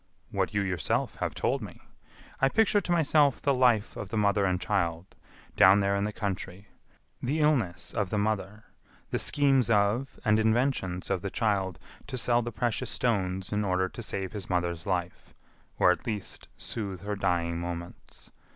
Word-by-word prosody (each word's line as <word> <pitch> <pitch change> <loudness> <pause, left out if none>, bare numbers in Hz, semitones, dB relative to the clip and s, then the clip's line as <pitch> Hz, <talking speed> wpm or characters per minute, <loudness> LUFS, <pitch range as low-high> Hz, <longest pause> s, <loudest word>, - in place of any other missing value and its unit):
"What - - 0
you 100 - +3
yourself 90 -6 -1
have - - -3
told - - 0
me. - - -9 0.6
I 135 - +4
picture 210 +3 +3
to 175 - -4
myself 150 -4 +3
the 140 - +2
life 120 -5 +2
of 95 - -6
the 110 - -3
mother 100 -1 +2
and 90 -1 +1
child 90 -4 -1 0.4
down 95 +3 +7
there 100 0 +1
in 100 +1 0
the 105 - -2
country; 100 -2 -5 0.5
the 145 +6 -1
illness 130 - +1
of 100 -3 -1
the 105 - -1
mother, 105 0 -2 0.5
the - - 0
schemes 135 -4 +3
of 110 +5 +1
and 110 0 +4
inventions 110 -6 0
of 95 -2 0
the 100 - -3
child 95 -5 0 0.3
to 130 - -4
sell 120 0 +2
the 120 0 -4
precious 120 +1 -1
stones 95 -5 0
in 105 0 +1
order 95 -1 +1
to 120 - -8
save 95 -4 -3
his 105 -3 -6
mother's 85 -1 -1
life, 90 -2 -3 0.4
or, 90 - +5
at 105 - -3
least, 105 -4 -4
soothe 100 -5 -5
her 105 +1 -3
dying 85 -3 0
moments. 85 0 -8
100 Hz, 175 wpm, -28 LUFS, 95-120 Hz, 0.6 s, down